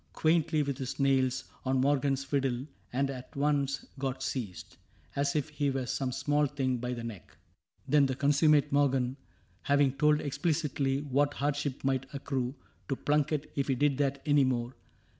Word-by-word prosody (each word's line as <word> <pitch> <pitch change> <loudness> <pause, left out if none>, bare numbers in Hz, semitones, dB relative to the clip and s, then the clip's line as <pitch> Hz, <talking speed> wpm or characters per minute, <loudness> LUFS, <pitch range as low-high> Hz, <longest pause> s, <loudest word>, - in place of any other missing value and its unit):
— - - -32
quaintly, 160 -1 +2
with 140 -1 -3
his 130 +1 -4
nails, 130 -1 +2
— - - -30
On 130 0 +1
Morgan's 135 0 +2
fiddle, 135 -2 -1 0.3
and 135 +2 0
at 130 -1 -9
once 140 -1 0
got 135 -1 -2
seized, 105 -9 -5 0.4
As 140 +1 0
if 150 0 0
he 145 -1 -1
were 135 -1 -1
some 130 +1 -2
small 145 +3 +1
thing, 130 -3 -1
by 125 +1 -3
the 120 -1 -5
neck. 115 -6 -9 0.5
Then 145 -2 +4
the 130 - -2
consummate 145 +1 +3
Morgan, 135 -3 +2 0.5
having 140 -1 +3
told 150 +2 +3
Explicitly 145 -3 0
what 145 0 +1
hardship 145 -1 -2
might 135 0 0
accrue 135 -2 -2 0.3
To 135 - +1
Plunket 150 +1 0
if 140 -2 0
he 135 - +2
did 140 +1 +1
that 140 -1 0
any 145 -2 +4
more. 125 -1 -1
140 Hz, 170 wpm, -30 LUFS, 130-145 Hz, 0.5 s, Then